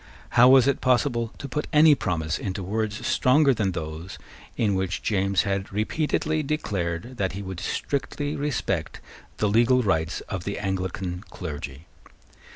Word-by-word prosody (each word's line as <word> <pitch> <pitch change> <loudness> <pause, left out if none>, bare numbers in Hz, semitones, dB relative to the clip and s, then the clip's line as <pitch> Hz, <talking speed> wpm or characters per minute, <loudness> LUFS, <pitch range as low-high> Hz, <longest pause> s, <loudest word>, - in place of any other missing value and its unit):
How 120 +2 +6
was 130 -2 +7
it 140 - +1
possible 120 -2 +1
to 140 - -6
put 150 +3 -3
any 155 0 +7
promise 85 - -1
into 95 0 -4
words 105 +2 -2
stronger 140 +2 +4
than 100 -5 -1
those 80 +2 -6 0.4
in 105 -3 +2
which 95 -2 -2
James 100 -3 +1
had 95 -1 -2
repeatedly 155 +8 0
declared 110 - -3
that 95 -4 -1
he 100 +2 -5
would 95 -2 -6
strictly 145 - -2
respect 130 - -2 0.4
the 105 - +1
legal 120 +4 +4
rights 80 -4 0
of 95 -4 -5
the 100 - -3
Anglican 95 -1 -3
clergy? 75 -3 -7
100 Hz, 150 wpm, -25 LUFS, 90-130 Hz, 0.4 s, was